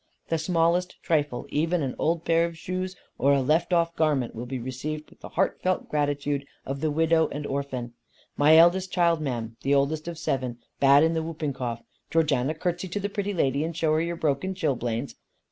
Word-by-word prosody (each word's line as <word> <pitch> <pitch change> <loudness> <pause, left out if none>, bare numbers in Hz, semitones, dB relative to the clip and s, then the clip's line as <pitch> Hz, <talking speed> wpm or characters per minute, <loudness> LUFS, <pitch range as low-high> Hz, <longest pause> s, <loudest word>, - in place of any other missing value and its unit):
The 165 - +1
smallest 170 +2 +1
trifle, 145 -6 0
even 165 +2 0
an 130 - -2
old 165 +1 0
pair 165 0 +3
of 170 -1 -10
shoes 185 +2 -4 0.2
or 140 +1 +4
a 140 - +3
left 155 +7 +2
off 170 -1 +2
garment 145 -6 +1
will 120 +2 -6
be 130 +1 -3
received 135 +5 -5
with - - -20
the - - -9
heartfelt 185 0 0
gratitude 145 -1 -1 0.2
of 135 +1 -4
the 155 - +1
widow 160 +1 +3
and 145 0 -5
orphan. 135 -4 -3 0.4
My 155 +2 +6
eldest 180 +3 +5
child, 170 -3 +2
ma'am, 115 -5 -3
the 140 +1 +2
oldest 150 +3 0
of 170 -1 -5
seven, 130 -6 -2 0.2
bad 140 +2 +6
in 165 +1 +3
the 160 - 0
whooping 160 -3 -3
cough. 120 -3 -4 0.3
Georgiana, 155 -3 +1
curtsey 175 +2 -2
to 185 +4 -3
the 205 +1 -2
pretty 205 0 -3
lady, 140 -3 +1
and 165 0 -4
show 160 -2 +2
her 155 - +2
your 170 +1 -2
broken 160 +4 -1
chilblains." 125 -6 -1
155 Hz, 195 wpm, -26 LUFS, 140-170 Hz, 0.4 s, My